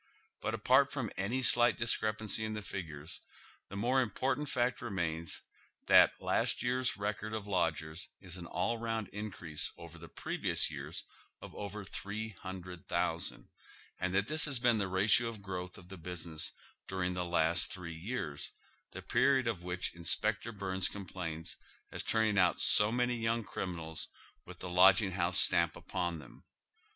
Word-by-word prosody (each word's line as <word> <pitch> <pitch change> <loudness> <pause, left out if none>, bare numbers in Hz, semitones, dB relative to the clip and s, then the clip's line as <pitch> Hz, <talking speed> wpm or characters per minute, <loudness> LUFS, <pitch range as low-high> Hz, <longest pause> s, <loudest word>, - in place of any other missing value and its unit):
But, - - -1
apart 135 +2 +4
from 130 -8 -2
any 115 +8 -1
slight 120 0 +4
discrepancy 110 -1 +1
in 110 0 -2
the 105 - -5
figures, 80 -4 -6 0.5
the 100 - -7
more 125 +6 +3
important 130 +5 -1
fact 125 -1 +1
remains 85 -7 -3 0.4
that - - +7
last - - +1
year's 125 -2 +1
record 105 +2 -2
of 105 -2 -4
lodgers 80 -3 -1
is 90 -2 -7
an 85 -2 -7
ail 115 +6 0
round 115 -3 -2
increase 90 -7 -4
over 85 0 -11
the 85 0 -10
previous - - 0
year's - - -6 0.4
of - - -10
over 105 0 -6
tliree 105 +3 -5
hundred 90 -2 -8
thousand, 85 -1 0 0.5
and 95 0 0
that 100 0 +3
this 155 +5 +3
has 140 -4 +1
been 120 -2 +3
the 100 - 0
ratio 100 +5 +4
of 110 -3 -6
growth 90 -2 -5
of 90 0 -14
the 95 - -8
business 85 -1 -4 0.4
during 90 -1 -1
the 90 0 -1
last 85 0 +2
three 90 -3 -6
years, 85 - -4 0.4
the - - -7
period 135 -2 +3
of 105 -7 -1
which 90 0 -3
Inspector 110 +6 -1
Byrnes 95 -2 0
complains 85 -5 -5 0.3
as - - -2
turning 110 -3 +2
out 90 -1 +4
so 105 +1 +5
many 125 0 +1
young 115 0 0
criminals 85 -4 -3 0.4
with - - -9
the - - -6
lodging 95 +2 +6
house 90 0 +2
stamp - - +4
upon 85 -3 -2
them. 75 - -13
95 Hz, 160 wpm, -33 LUFS, 90-110 Hz, 0.5 s, that